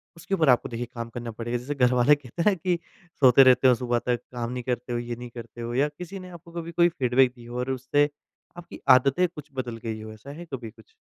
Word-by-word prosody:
उसके 195 +4 -2
ऊपर 155 -6 +3
आपको 125 - +3
देखिए 120 +1 -4
काम 115 0 -5
करना 120 0 -6
पड़ेगा। 120 +2 -3
जैसे 140 +4 -5
घरवाले 125 +2 +4
कहते 145 - -1
हैं 195 - +1
कि 175 +1 0 0.4
सोते 135 0 +8
रहते 130 0 +6
हो 125 - +6
सुबह 120 -1 0
तक 120 -2 +1
काम 120 0 -3
नहीं 125 -1 -4
करते 125 0 -3
हो, 120 - 0
ये 120 0 -4
नहीं 120 0 -9
करते 120 0 -10
हो 120 +1 -4
या 140 +4 +2
किसी 180 +6 -8
ने 185 0 -10
आपको 170 -1 -13
कभी 170 0 -6
कोई 170 +1 +4
फीडबैक 130 -3 +2
दी 120 -1 -14
हो 120 +1 -7
और 130 +1 -1
उससे 140 +3 +1 0.5
आपकी 175 - -10
आदतें 135 +7 +5
कुछ 150 -3 -12
बदल 125 -3 -4
गई 110 -1 -4
हो 110 0 -8
ऐसा 110 +6 -13
है 175 - -8
कभी 115 -4 -5
कुछ? 445 - -21
125 Hz, 250 wpm, -26 LUFS, 120-150 Hz, 0.5 s, सोते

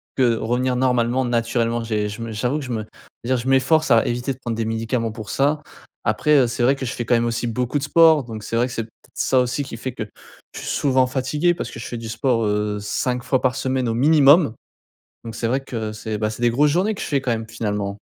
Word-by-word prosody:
que 125 -3 +3
revenir 125 +3 0
normalement, 125 0 +1
naturellement. 115 -1 0
J'ai 105 -2 -1
je 105 +3 -7
me 115 -1 -5
j'avoue 125 +7 -1
que 140 - -6
je 125 - -6
me 110 -2 -2
je 115 +2 -13
veux - - +4
dire, - - +1
je 120 - -5
m'efforce 135 +4 +3
à 115 -2 +5
éviter 120 +3 -1
de - - -16
prendre 120 -3 -4
des 115 - -1
médicaments 115 +1 -1
pour 110 -2 -8
ça. 145 +2 +1 0.4
Après, 150 0 +2
heu, 130 - +4
c'est 120 +1 -2
vrai 135 +3 +4
que 135 - -5
je 120 - -3
fais 120 - -4
quand - - +1
même 115 - +1
aussi 120 +1 -1
beaucoup 125 +4 -1
de 135 - -6
sport, 160 -1 +5
donc 110 -3 -7
c'est 115 - -4
vrai 120 +2 +2
que, 125 - -8
c'est 115 - -2
peut-être 110 - -21
ça 130 - +2
aussi 125 +3 0
qui 125 -4 -8
fait 130 +1 -5
que 110 - -4 0.5
je - - -7
suis - - -7
souvent 130 -2 +2
fatigué, 145 +7 +1
parce - - -5
que - - -9
je 115 - -6
fais 120 - -6
du 115 -1 -7
sport, 115 0 0
heu, 105 0 0
5 125 +4 -2
fois 130 0 +1
par 130 -1 +1
semaine 130 -2 -1
au - - 0
minimum, 145 +1 +5 0.7
donc 115 -1 -6
c'est 115 - -2
vrai 130 +4 +1
que 110 -5 -4
c'est, 110 0 -5
bah, 110 0 -1
c'est 110 +2 -7
des 120 - +4
grosses 145 +5 +3
journées 190 +7 +1
que - - -7
je - - -3
fais 140 - +1
quand 125 -2 -1
même, 115 -1 -2
finalement. 105 -2 -3
120 Hz, 270 wpm, -21 LUFS, 115-130 Hz, 0.7 s, à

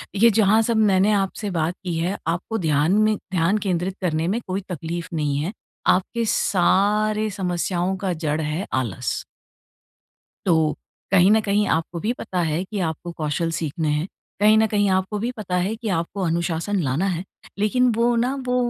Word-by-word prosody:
ये 230 +4 +6
जहाँ 215 0 +4
सब 230 - +2
मैंने 195 +2 +3
आपसे 200 +1 -1
बात 160 +2 0
की 175 -3 -2
है, 180 +5 -1
आपको 175 +7 -1
ध्यान 155 -3 +2
में 215 0 +2
ध्यान 185 +1 0
केंद्रित 185 -2 -1
करने 165 -2 0
में 210 +6 0
कोई 190 +1 -2
तकलीफ 170 0 -4
नहीं 150 -3 0
है। 165 +8 -2 0.4
आपके 230 +5 -2
सारे 210 +3 +2
समस्याओं 180 -1 -1
का 190 -1 -1
जड़ 150 +1 0
है, 155 +5 -2
आलस। 120 -8 -2 1.2
तो, 160 -4 +2 0.3
कहीं 190 -1 +6
न 220 - +5
कहीं 205 0 +1
आपको 165 +1 -1
भी 215 +6 -1
पता 185 -6 -4
है 165 +1 0
कि 200 +2 -5
आपको 170 0 -3
कौशल 165 +1 -2
सीखने 160 -1 -2
हैं। 150 +3 0 0.3
कहीं 215 +1 +6
न 220 0 +4
कहीं 205 -1 +1
आपको 190 +2 0
भी 235 +4 -1
पता 185 -4 -3
है, 185 +5 0
कि 225 0 -7
आपको 170 +4 -3
अनुशासन 170 +4 -1
लाना 140 +7 0
है। 180 -2 -2 0.4
लेकिन 245 +4 +3
वो 235 +1 +2
ना, 245 +3 +1
वो 250 - +1
185 Hz, 175 wpm, -23 LUFS, 165-210 Hz, 1.2 s, ये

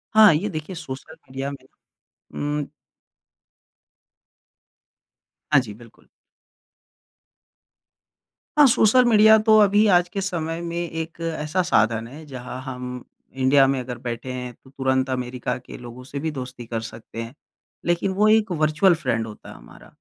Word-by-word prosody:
हाँ, 215 -6 +8
ये 205 +7 -1
देखिए 155 +2 -6
सोशल 140 0 -8
मीडिया 135 +2 -4
में 140 - -11 1.0
उ - - -6 2.9
हाँ, 140 - +8
जी। 105 -5 -8
बिल्कुल। 115 +1 -18 2.5
हाँ, 295 - +8
सोशल 245 +2 +5
मीडिया 220 -1 +7
तो 215 0 +7
अभी 205 +1 +5
आज 175 0 +3
के 195 - -2
समय 165 -3 -3
में 170 0 -5
एक 165 -1 -4
ऐसा 160 +1 -1
साधन 115 -7 +1
है 150 +5 -11
जहाँ 125 -1 -7
हम 125 -2 -6 0.5
इंडिया 135 +1 +4
में 135 -1 0
अगर 125 -1 -6
बैठे 120 +1 -5
हैं 125 -1 -6
तो 130 - -21
तुरंत 130 -1 0
अमेरिका 125 -1 -3
के 125 - -11
लोगों 125 0 -10
से 140 +2 -6
भी 160 +1 -2
दोस्ती 125 -3 -7
कर 115 -1 -4
सकते 115 0 -8
हैं। 115 +3 -8 0.5
लेकिन 175 +3 +1
वो 210 +3 +3
एक 215 -3 +3
वर्चुअल 155 +3 +3
फ्रेंड 115 -7 -2
होता 105 - -11
है - - -10
हमारा, - - -15
140 Hz, 145 wpm, -23 LUFS, 125-175 Hz, 2.9 s, हाँ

